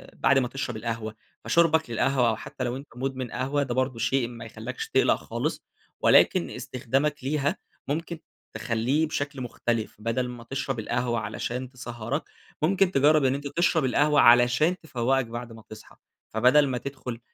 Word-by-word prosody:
بعد 135 - +4
ما 125 - 0
تشرب 120 -2 -4
القهوة. 110 -1 -4 0.3
فشُربك 160 -3 +3
للقهوة، 125 +1 +2
أو 110 - 0
حتى - - -7
لو 120 0 -2
أنت 140 +2 -8
مُدمن 130 -1 -4
قهوة، 135 +3 0
ده 125 -3 -3
برضه 130 -2 0
شيء 120 +2 +1
ما 115 -1 -9
يخلّيكش 110 +3 -6
تقلق - - +4
خالص، - - -4 0.4
ولكن - - +5
استخدامك 135 +4 -2
ليها 145 0 0 0.3
ممكن 165 +3 -3 0.4
تخلّيه 115 +7 0
بشكل 145 -2 -3
مختلف. 120 -2 -2
بدل 115 +3 -1
ما 120 -1 -8
تشرب 135 0 -3
القهوة 120 +1 -1
علشان 120 +4 -4
تسهِّرك، 120 +2 -4 0.4
ممكن 190 +3 +3
تجرِّب 150 -1 +4
إن 130 0 +2
أنت 140 +1 -5
تشرب 165 -1 +1
القهوة 145 +3 +3
علشان 120 +9 +5
تفوِّقك 135 -3 0
بعد 120 +1 -7
ما 110 -1 -13
تصحى. 110 0 -12 0.4
فبدل 125 +6 +5
ما 130 -2 -1
تدخل 130 -3 -6
130 Hz, 160 wpm, -26 LUFS, 120-140 Hz, 0.4 s, ولكن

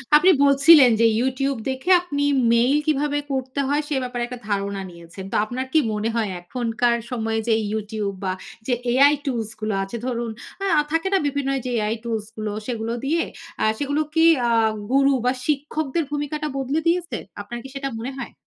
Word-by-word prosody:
আপনি 360 +5 +7
বলছিলেন 280 -1 +7
যে 230 - +6
YouTube 265 0 -1
দেখে 265 +7 -4
আপনি 285 -5 -2 0.3
mail 245 +5 +4
কিভাবে 295 -1 +1
করতে 260 0 -3
হয় 290 +2 +1
সে 295 - -2
ব্যাপারে 245 -1 -3
একটা 245 0 -8
ধারণা 200 -1 -1
নিয়েছেন। 170 +2 -11
তো - - -2
আপনার 250 +4 -4
কি 320 - +6
মনে 210 +1 -1
হয় 225 -3 0
এখনকার 235 +4 0
সময়ে 225 -2 -1
যে 225 - +4 0.2
YouTube 210 -2 -3
বা 185 -1 0 0.3
যে 255 - +2 0.2
AI 280 +4 +6
টুলস 235 -6 -2
গুলো 215 0 -1
আছে, 195 +5 -6
ধরুন 235 -2 -2 0.5
আ - - +5
থাকে 325 +4 0
না - - +5
বিভিন্ন 280 -1 -1
এইযে 255 0 -5
AI 215 0 0
টুলস 225 -3 -2
গুলো, 215 -1 -3 0.2
সেগুলো 230 -2 -3
দিয়ে 330 +4 +1 0.4
আ - - +2 0.2
সেগুলো 285 +1 0
কি 325 0 +5 0.2
আ - - +2 0.4
গুরু 275 +1 +4
বা 250 - +4 0.2
শিক্ষকদের 300 +1 -1
ভূমিকাটা 295 +1 -2
বদলে 270 +3 0
দিয়েছে? 345 0 0 0.2
আপনার 240 +4 -7
কি 270 - -9
সেটা 275 0 -3
মনে 245 +4 -4
হয়? 245 - -6
255 Hz, 180 wpm, -22 LUFS, 225-285 Hz, 0.5 s, আপনি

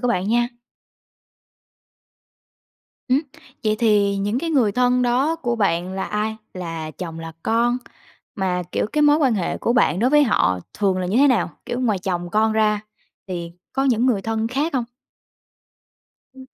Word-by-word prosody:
của 245 - 0
bạn 195 -4 0
nha. 240 +2 +2 2.6
Ừm, 260 +2 +3 0.4
vậy 215 0 +2
thì 205 -3 +3
những 205 +4 -1
cái 330 +4 -2
người 250 -9 +3
thân 250 +2 +2
đó 260 +7 +2
của 245 -7 -2
bạn 185 -3 0
là 190 0 -3
ai? 215 +1 -2 0.2
Là 165 -3 -5
chồng, 165 0 -7
là 165 0 -7
con? 235 +2 +1 0.6
Mà, 185 -4 -1
kiểu, - - 0
cái 300 - +2
mối 295 0 +6
quan 270 -7 +2
hệ 185 -5 -2
của 235 - 0
bạn 235 -7 +3
đối 245 +5 +2
với 295 0 +6
họ 95 - +2 0.2
thường 195 -3 +1
là 185 - -2
như 195 +5 0
thế 280 +3 +6
nào? 250 -4 +2 0.2
Kiểu, 240 - -3
ngoài 220 -6 +1
chồng 175 -2 -3
con 220 +2 +2
ra 215 -1 +2 0.5
thì 170 -2 -5 0.2
có 270 - 0
những 245 -2 +2
người 220 -7 +1
thân 225 +1 -1
khác 280 +6 -1
hông? 250 -3 +1 1.5
Ừm. 265 0 -12
220 Hz, 175 wpm, -22 LUFS, 190-250 Hz, 2.6 s, mối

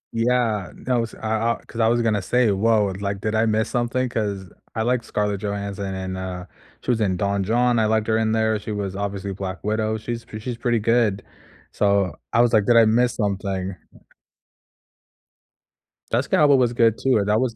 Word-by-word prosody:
Yeah. 115 -4 +1
No, 125 -2 -1
s 115 - -7
I 110 +1 +1
I - - -22
'Cause 115 - -9
I 110 - +4
was 120 +1 +2
gonna 105 -3 +1
say, 125 +4 +2
"Woah. 100 -1 +1
Like, 100 -1 -2
did 110 - -2
I 110 +1 +2
miss 110 0 +1
something?" 125 +1 0
'cause 100 -5 -3 0.3
I 110 - 0
like 120 0 0
Scarlett 105 -2 -2
Johansson, 100 -1 -4
and, 95 0 -4
uh, 90 -1 -5 0.4
she - - -1
was 115 -2 0
in 95 -3 +1
Don 100 0 0
Jon, 120 +3 +2
I 110 - +3
liked 110 0 +1
her 110 0 +2
in 110 -1 +1
there, 110 -1 +1
she 110 - -6
was 100 -2 -3
obviously 100 -1 -3
Black 95 0 -6
Widow, 110 +1 0
she's 115 +1 -5
pr 110 - -8
she's 120 +2 -5
pretty 120 -1 +1
good, 110 -2 +1 0.5
so 100 -3 +1 0.2
I 120 - +4
was 120 0 +2
like, 105 -2 +4
"Did 120 - +5
I 115 - +7
miss 120 +2 +2
something?" 95 -2 -2 2.4
Jessica - - +1
Alba 145 -2 +6
was 120 -2 +2
good 115 -2 +3
too. 130 -4 +2
Uh, 100 - +1
that 105 +2 +2
was 125 -3 -1
110 Hz, 200 wpm, -22 LUFS, 100-115 Hz, 2.4 s, I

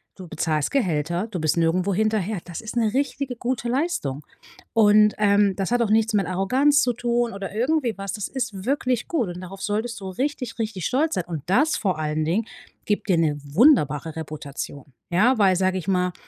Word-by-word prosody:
Du 185 -2 -10
bezahlst 155 -2 -1
Gehälter. 175 - 0
Du 190 -5 -5
bist 155 +1 +1
nirgendwo 180 +4 +1
hinterher. 215 -1 0
Das 175 -2 -7
ist 225 +1 -7
'ne 225 -3 +2
richtige, 275 -1 -1
gute 240 0 -2
Leistung. 240 - -2 0.5
Und, 210 -1 +5
ähm, 200 -1 +3
das 195 -1 -2
hat 245 0 +2
auch 215 - -1
nichts 220 0 +3
mit 200 -2 +2
Arroganz 260 - +3
zu 245 - +1
tun, 240 0 0
oder 195 0 -6
irgendwie 250 0 +1
was, 195 -1 -4
das 210 -2 -3
ist 220 -7 -4
wirklich 255 -3 0
gut 285 - 0
und 175 +1 -7
darauf 190 +1 -9
solltest 220 +3 -2
du 190 - -5
richtig, 255 +3 -3
richtig 215 -6 -3
stolz 310 +5 +1
sein. 180 - -2
Und 160 -5 -5
das 290 - +3
vor 185 -7 -1
allen 155 0 -1
Dingen 190 +8 0 0.4
gibt 210 0 -1
dir 180 - +4
'ne 155 -3 +1
wunderbare 155 - +3
Reputation, 145 -3 -7 0.3
ja? 225 +9 +4
Weil, 195 -3 +4
sage 185 +1 +1
ich 185 - -6
mal, 180 -2 +1
205 Hz, 195 wpm, -23 LUFS, 175-240 Hz, 0.5 s, Und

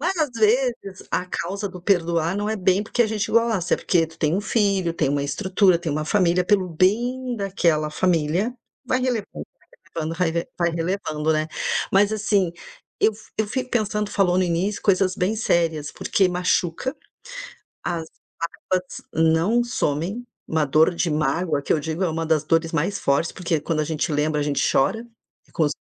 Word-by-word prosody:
Várias 325 -4 0
vezes 225 -3 +1
a - - +1
causa 195 +3 -3
do 180 -1 -10
perdoar 170 -2 +1
não 205 +1 -1
é 220 - -1
bem 190 +1 +2
porque 230 +3 +1
a 230 - +1
gente 215 0 -2
gosta, 225 -6 +2
é - - -3
porque 165 -2 +1
tu 165 +1 -18
tem 155 +1 +1
um - - 0
filho, 200 -5 +1
tem 155 -4 +1
uma 140 0 0
estrutura, 185 +3 +2
tem 165 -4 -3
uma 155 +1 -2
família, 180 0 +2
pelo 190 -1 +2
bem 240 +9 0
daquela 170 -6 0
família 175 +6 +1 0.3
vai 255 - +1
relevando 245 -5 -1 0.3
vai - - -31 0.3
relevando 160 0 -2
raive 170 -1 -1
vai 170 -1 +2
relevando, 165 -3 -1
né. 155 +1 -1 0.4
Mas 200 +2 +4
assim, 205 -4 +1 0.5
eu 220 - +4
fi 215 - -17
eu 220 - +1
fico 255 +1 -3
pensando 210 -2 0
tu - - -10
falou 185 -3 +2
no 185 - +3
início 180 +4 -1
coisas 190 -2 +2
bem 200 +3 0
sérias, 165 -8 0
porque 190 -2 +1
machuca, 180 - 0 0.9
as 170 -2 -2 0.7
mágoas 185 0 -1
não 165 +9 +3
somem. 195 0 -2 0.3
Uma 160 -2 +2
dor 155 +5 +3
de 170 -1 0
mágoa, 150 +1 0
que - - -3
eu 155 - +1
digo, 160 +4 -3
é 175 - +1
uma 165 +1 -2
das 160 -2 +2
dores 165 +1 +1
mais 170 +5 0
fortes, 140 +4 +1
porque 170 -4 -1
quando 155 -2 -1
a - - +1
gente 155 0 -2
lembra, 150 0 0
a - - 0
gente 145 -1 +1
chora, 220 - +1 0.4
e - - -26
quando 155 -3 +1
180 Hz, 185 wpm, -23 LUFS, 160-205 Hz, 0.9 s, Mas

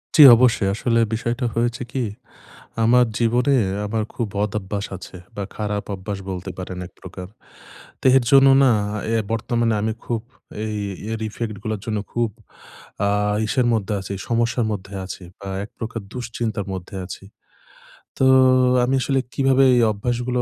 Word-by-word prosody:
জী, 155 - +10
অবশ্যই। 115 -5 +3
আসলে 115 +1 +1
বিষয়টা 120 +3 -1
হয়েছে 120 +1 0
কি? 130 -2 -1 0.8
আমার 125 +2 +5
জীবনে 125 +4 +3 0.3
আমার 110 +1 -1
খুব 120 - -2
বদঅভ্যাস 105 0 -2
আছে, 90 - -10 0.2
বা 100 - -3
খারাপ 105 -1 -2
অভ্যাস 100 +1 -5
বলতে 90 -1 -5
পারেন 90 0 -6
একপ্রকার। 90 0 -10 0.8
দেহের 130 -1 +5
জন্য 135 0 +7 0.2
না, 130 - +5 0.4
অ্যা 115 0 +1
বর্তমানে 115 0 0
আমি 110 +1 0
খুব 115 -2 -2 0.4
অ্যা 110 +1 -3 0.4
ইয়ের 110 0 -4
ইফেক্ট 110 0 -4
গুলোর 110 -2 -2
জন্য 110 -2 -1
খুব 120 -1 0 0.8
আ - - +2 0.4
ইসের 120 +2 +1
মধ্যে 105 -1 -1
আছি, 95 +1 -6 0.2
সমস্যার 115 0 +1
মধ্যে 100 -1 -6
আছি, 95 - -8 0.2
বা 100 - -7 0.2
একপ্রকার 115 0 -6
দুশ্চিন্তার 115 -4 -3
মধ্যে 95 +1 -7
আছি। 95 - -8 0.9
তো 130 - +3 0.6
আমি 130 +2 +2
আসলে 135 0 +1
কিভাবে 135 0 +3
এই 120 - +4
অভ্যাসগুলো 120 +3 -1
115 Hz, 145 wpm, -22 LUFS, 105-120 Hz, 0.9 s, জী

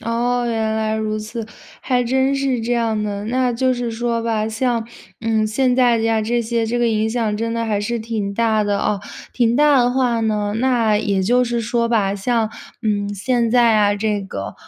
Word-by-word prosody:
哦， 240 +1 -1
原 220 -1 -1
来 220 0 -1
如 215 0 -2
此， 220 +1 -6 0.4
还 250 -2 +1
真 265 +3 +1
是 270 -3 0
这 240 +2 -1
样 225 -3 0
的。 205 0 -4
那 250 +1 +1
就 255 +2 +1
是 240 -1 -3
说 230 0 -2
吧， 220 -1 -1
像 230 0 -1 0.3
嗯， 220 -1 +1
现 250 +3 +1
在 245 -3 +4
呀， 225 -1 +1
这 240 +2 0
些， 230 0 -1
这 240 +2 -1
个 240 -1 +2
影 220 0 +1
响 220 -3 -1
真 230 +1 -2
的 230 0 -1
还 210 -2 0
是 235 +3 -2
挺 215 -3 -3
大 220 -1 +1
的 205 -1 0
啊。 210 -1 0 0.4
挺 235 -1 +2
大 290 -1 +5
的 245 - +2
话 245 -3 +1
呢， 210 -2 -1
那 230 -4 +2
也 200 -2 0
就 245 +5 +3
是 235 0 -1
说 235 +1 0
吧， 200 -4 +1
像 220 +2 0 0.3
嗯， 205 -2 -1
现 235 +3 0
在 235 -2 +4
啊， 205 -1 +3
这 205 -1 -1
个， 100 - -6
230 Hz, 215 characters per minute, -20 LUFS, 215-240 Hz, 0.4 s, 大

